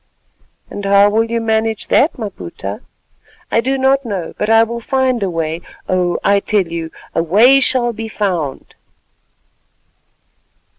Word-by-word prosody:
"And 205 - -6
how 200 +1 +4
will 225 +2 +2
you 230 0 -2
manage 220 -1 -1
that, 305 +4 +3
Maputa?" 100 - -6 0.7
"I 230 - +3
do 265 +3 -1
not 270 +1 +2
know, 195 -8 -4
but 210 - -2
I 225 0 +6
will 235 +1 -4
find 260 -1 0
a 195 - 0
way. 165 -1 -3 0.3
Oh! 180 -1 0
I 200 0 +3
tell 200 -1 0
you, 165 -1 -5 0.2
a - - +1
way 220 +11 +5
shall 250 -2 +1
be 225 +1 -6
found." 180 -10 -3
215 Hz, 145 wpm, -16 LUFS, 180-235 Hz, 0.7 s, I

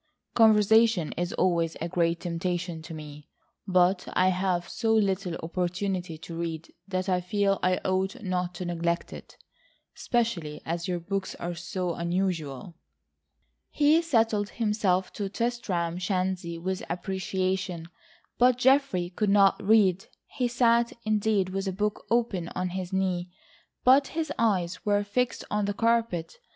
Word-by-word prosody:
Conversation 220 -4 +5
is 175 +1 -2
always 170 -3 +1
a 170 - -2
great 170 -1 0
temptation 175 -1 -3
to 160 +1 -9
me, 150 -1 -10 0.4
but 180 0 +3
I 185 0 +4
have 180 -1 0
so 225 -1 0
little 195 -4 +1
opportunity 180 0 -2
to 165 +1 -9
read 165 -1 -5
that 185 -1 -2
I 180 -1 +1
feel 195 +2 +1
I 185 0 +2
ought 190 +5 0
not 180 -2 -2
to 180 - -5
neglect 170 0 -2
it,—especially 210 -11 -5
as 170 +1 -3
your 180 -1 -1
books 195 +2 -3
are 175 0 -4
so 175 +1 -3
unusual." 170 -3 -2 1.0
He 305 +2 +4
settled 225 -9 +1
himself 210 -5 0
to 200 -2 -3
Tristram 190 -7 -2
Shandy 185 -2 -2
with 185 +2 -3
appreciation, 185 -1 -2 0.5
but 250 0 +5
Geoffrey 250 -9 +2
could 205 +3 0
not 200 -1 +4
read. 195 -3 +3 0.2
He 250 - -2
sat, 235 -1 +2
indeed, 210 -3 +1
with 195 +1 -3
a - - 0
book 205 +2 -2
open 225 -7 0
on 185 0 -1
his 185 0 -5
knee, 185 -2 -1 0.5
but 270 +2 +6
his 315 -3 -1
eyes 185 -6 0
were 205 0 +2
fixed 245 +5 -1
on 210 -1 +1
the 205 0 -2
carpet. 230 - 0
185 Hz, 140 wpm, -27 LUFS, 175-210 Hz, 1.0 s, but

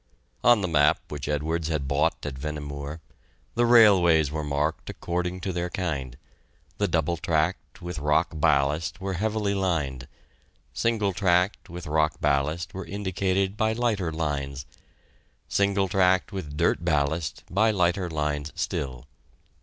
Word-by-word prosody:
On 120 -3 +6
the 95 - 0
map 75 -3 +3
which 75 -2 -5
Edwards 80 +2 -1
had 75 -4 -2
bought 70 +2 0
at 70 - -3
Vehnemoor, 75 +2 -6 0.5
the 120 0 +2
railways 90 - +6
were 75 0 -3
marked 75 +2 -2
according 90 +1 -3
to 95 0 -3
their 90 0 -2
kind: 75 - -3 0.6
the 100 - +2
double 85 0 0
tracked, 80 -1 -1
with 90 -3 -5
rock 75 +1 +2
ballast, 75 +1 +1
were 95 0 -3
heavily 105 +2 -1
lined; 75 -10 -1 0.7
single 105 -4 0
tracked 90 +1 +1
with 85 +1 -7
rock 75 0 +1
ballast, 75 +4 0
were 95 - -6
indicated 95 0 -1
by 110 +1 +1
lighter 110 -7 0
lines; 70 -4 -3 0.8
single 100 -1 +1
tracked, 95 +1 +2
with 75 -7 -6
dirt - - +1
ballast, 75 -1 0
by 110 +4 +2
lighter 90 -2 +1
lines 75 -1 -2
still. 65 -2 -3
85 Hz, 140 wpm, -26 LUFS, 75-95 Hz, 0.8 s, On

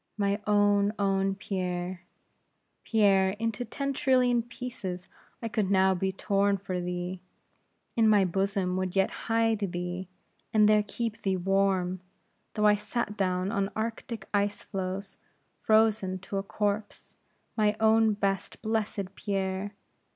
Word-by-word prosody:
"My 200 0 +1
own, 205 0 +3
own 195 -1 +1
Pierre! 180 -2 -3 0.8
Pierre, 195 -3 +3
into 225 +1 -2
ten 275 +4 -3
trillion 250 -3 +3
pieces 230 -7 -6 0.4
I - - -1
could 215 -3 -1
now 190 -1 +4
be 190 +1 -1
torn 200 +1 +1
for 185 -2 -4
thee; 180 +1 -4 0.7
in 225 -1 +4
my 205 -3 +5
bosom 190 0 0
would 185 0 -2
yet 195 0 +3 0.2
hide 225 -1 +2
thee, 175 +1 -4 0.4
and 215 -2 +5
there 215 0 +5
keep 225 +1 -4
thee 190 -1 0
warm, 190 -1 +1 0.6
though 210 -1 +2
I 210 - +7
sat 210 +1 -2
down 185 -1 0
on 200 -3 0
Arctic 225 -1 -4
ice 205 0 0
floes, 195 0 -5 0.4
frozen 215 -4 +3
to 195 +1 -4
a - - -1
corpse. 205 +1 -3 0.4
My 210 -1 +2
own, 220 0 +4
best, 195 -2 -2
blessed 215 -3 -2
Pierre! 195 0 -3
200 Hz, 135 wpm, -28 LUFS, 190-215 Hz, 0.8 s, I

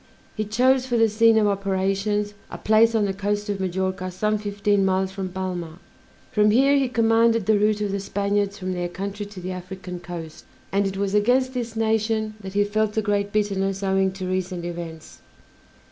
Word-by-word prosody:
He 215 - -2
chose 255 +4 +2
for 240 -2 +1
the 225 0 +5
scene 225 +1 +4
of 215 - +4
operations 200 +1 0 0.2
a - - -7
place 225 +1 +4
on 215 -2 +3
the 195 - -1
coast 205 +1 -2
of 200 -1 -2
Majorca 185 0 -2
some 210 +4 -1
fifteen 205 -1 0
miles 190 0 +1
from 190 -1 -4
Palma; 180 -3 -5 0.5
from 210 0 +4
here 270 +6 +4
he 270 -2 +2
commanded 230 -2 +3
the 215 0 +3
route 210 0 +2
of 205 -1 -1
the 200 - -1
Spaniards 200 0 -1
from 185 -1 -3
their 175 -1 -2
country 200 +3 -5
to 205 -2 -10
the 185 +1 -5
African 180 0 -7
coast, 170 -3 -8 0.3
and 200 0 +2
it 195 0 -4
was 200 0 -1
against 250 +5 +2
this 235 -3 -4
nation 220 -1 0
that 190 -1 -8
he 205 0 +3
felt 215 +1 -1
a 220 - +2
great 205 -1 0
bitterness 195 -2 -1
owing 190 0 +2
to 185 -1 -5
recent 185 -1 -2
events. 170 -2 -7
200 Hz, 190 wpm, -23 LUFS, 190-215 Hz, 0.5 s, the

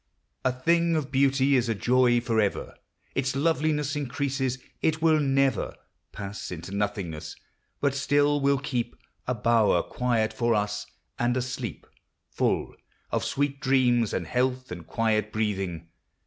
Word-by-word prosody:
A 130 - +3
thing 170 +6 +2
of 145 -3 -2
beauty 135 0 +3
is 120 -2 +2
a 115 - +1
joy 120 +3 +3
forever: 110 -4 0 0.4
Its 130 0 -1
loveliness 150 -1 +1
increases; 135 -2 -1 0.2
it 160 0 +1
will 160 -1 +4
never 135 -1 +1 0.4
Pass 100 0 -6
into 90 +2 -7
nothingness; 95 -7 -3 0.5
but 140 -1 +2
still 145 +1 +2
will 140 0 +3
keep 125 -3 -3 0.3
A 125 - 0
bower 110 -5 +3
quiet 120 -3 0
for 120 -1 +1
us, 105 0 -1 0.3
and 120 +1 +1
a - - +1
sleep 125 - -5 0.5
Full - - 0 0.4
of - - 0
sweet 140 0 -1
dreams, 125 -4 +3
and 85 - -2
health, 125 +4 -1
and 85 -2 -7
quiet 110 -2 0
breathing. 95 -7 -2
125 Hz, 140 wpm, -27 LUFS, 110-140 Hz, 0.5 s, will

